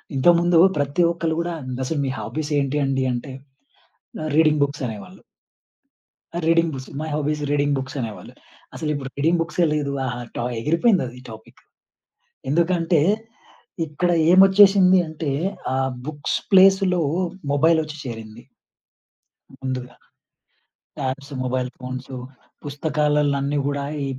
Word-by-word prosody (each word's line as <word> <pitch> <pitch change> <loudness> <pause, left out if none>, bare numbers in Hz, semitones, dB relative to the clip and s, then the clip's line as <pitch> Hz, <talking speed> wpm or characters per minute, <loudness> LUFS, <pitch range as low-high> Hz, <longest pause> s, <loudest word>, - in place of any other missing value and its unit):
ఇంతకు 170 +6 +5
ముందు 175 -1 +3 0.2
ప్రతి 145 +4 0
ఒక్కళ్ళు 165 -2 -2
కూడా 170 0 -3 0.3
అసలు 150 +1 -2
మీ 135 - -1
హాబీసేంటి 145 -2 -2
అండి 135 -1 0
అంటే 125 +2 -5 0.9
ఆహ్, 155 - -3
రీడింగ్ 155 -2 +4
బుక్స్ 145 0 -3
అనేవాళ్ళు. 115 - -9 1.1
ఆ! - - -1
Reading 165 0 +3
books, 130 -1 -7
my 155 - -4
hobby 150 0 0
is 150 - -6
reading 145 0 +1
books 130 +2 -5
అనేవాళ్ళు. 110 -3 -6 0.4
అసలిప్పుడు 145 -4 -3
రీడింగ్ 165 +4 +2
బుక్సే 170 +1 0
లేదు. 145 -2 -1
ఆహా! 120 -1 -4 0.2
To - - -1 0.2
ఎగిరిపోయిందది 165 - +1
topic. 110 0 -13 0.9
ఎందుకంటే, 170 0 +2 0.9
ఇక్కడ 175 +4 0 0.2
ఏమొచ్చేసింది 190 0 +6
అంటే, 155 -2 -4 0.4
ఆ - - 0 0.3
బుక్స్ 145 -1 -2 0.2
ప్లేస్‌లో 190 -1 +5 0.5
మొబైల్ 160 +3 +3
ఒచ్చి 155 0 -8
చేరింది... 115 0 -8 1.2
ముందుగా. 130 -1 -4 1.0
ట్యాబ్సు, 140 +1 -4
మొబైల్ 125 0 -1
ఫోన్సు, 130 +1 -7 0.5
పుస్తకాల్లని 145 -1 0
కూడా 140 0 -2 0.2
ఈ - - -1
150 Hz, 120 wpm, -22 LUFS, 135-165 Hz, 1.2 s, ఏమొచ్చేసింది